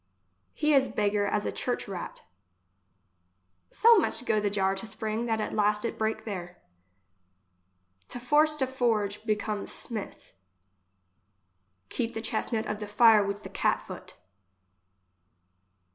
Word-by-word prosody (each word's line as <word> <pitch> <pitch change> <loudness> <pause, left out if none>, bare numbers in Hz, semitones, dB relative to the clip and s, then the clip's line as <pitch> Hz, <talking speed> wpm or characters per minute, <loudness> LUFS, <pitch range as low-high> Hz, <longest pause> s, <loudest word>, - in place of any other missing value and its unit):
He 300 0 +2
is 270 -1 +5
beggar 205 -1 0
as 210 0 -1
a - - -1
church 245 -3 -2
rat 190 -3 -7 1.5
So 460 -1 +6
much 285 -6 -1
go 215 - +2
the 205 -1 0
jar 195 -1 +1
to 225 - -4
spring 220 +2 -3
that 225 -1 0
at 215 - -3
last 210 +1 +2
it - - -4
break 220 0 -1
there. 180 -4 -6 1.5
To 245 - -6
force 300 +5 +3
to 275 -3 +1
forge, 225 -6 -1
becomes 210 -1 -2
smith. 220 -4 -7 1.6
Keep 235 -1 -3
the 225 - -3
chestnut 220 0 -1
of 210 - -3
the 210 - -5
fire 215 0 +6
with 200 +1 -4
the - - -8
cat - - +1
foot. - - -10
215 Hz, 135 wpm, -28 LUFS, 205-240 Hz, 1.6 s, So